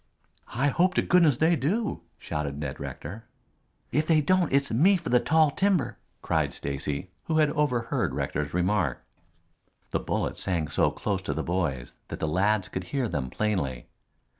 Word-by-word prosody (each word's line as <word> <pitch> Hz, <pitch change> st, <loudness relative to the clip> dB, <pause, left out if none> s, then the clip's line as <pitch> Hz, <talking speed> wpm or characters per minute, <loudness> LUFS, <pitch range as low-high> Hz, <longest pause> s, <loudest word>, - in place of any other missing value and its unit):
"I 135 Hz, +4 st, +2 dB
hope 185 Hz, +5 st, +2 dB
to -, -, +3 dB
goodness 165 Hz, -8 st, +4 dB
they 165 Hz, +4 st, +4 dB
do," 185 Hz, -, -1 dB, 0.2 s
shouted 70 Hz, -2 st, -4 dB
Ned 75 Hz, -2 st, -5 dB
Rector. 105 Hz, +10 st, -7 dB, 0.7 s
"If 150 Hz, +4 st, +1 dB
they 160 Hz, -2 st, +5 dB
don't 180 Hz, +3 st, +2 dB
it's 140 Hz, +1 st, +2 dB
me 175 Hz, -, +5 dB
for 170 Hz, -2 st, -6 dB
the 125 Hz, -, +5 dB
tall 155 Hz, +5 st, +3 dB
timber," 190 Hz, -2 st, +1 dB, 0.2 s
cried -, -, 0 dB
Stacy, 70 Hz, +5 st, -4 dB
who 160 Hz, -, 0 dB
had 155 Hz, -2 st, +4 dB
overheard 125 Hz, -6 st, 0 dB
Rector's 75 Hz, -1 st, -2 dB
remark. 90 Hz, -6 st, 0 dB, 0.9 s
The -, -, +1 dB
bullets -, -, -2 dB
sang 85 Hz, -5 st, -1 dB
so -, -, +2 dB
close 100 Hz, -3 st, -2 dB
to 75 Hz, -6 st, -3 dB
the 80 Hz, -, -2 dB
boys 80 Hz, -9 st, -2 dB
that -, -, -6 dB
the 80 Hz, -, -1 dB
lads 95 Hz, +4 st, +1 dB
could 95 Hz, 0 st, -5 dB
hear 135 Hz, +3 st, -1 dB
them 65 Hz, -10 st, -3 dB
plainly. 70 Hz, -, -2 dB
110 Hz, 165 wpm, -27 LUFS, -, 0.9 s, they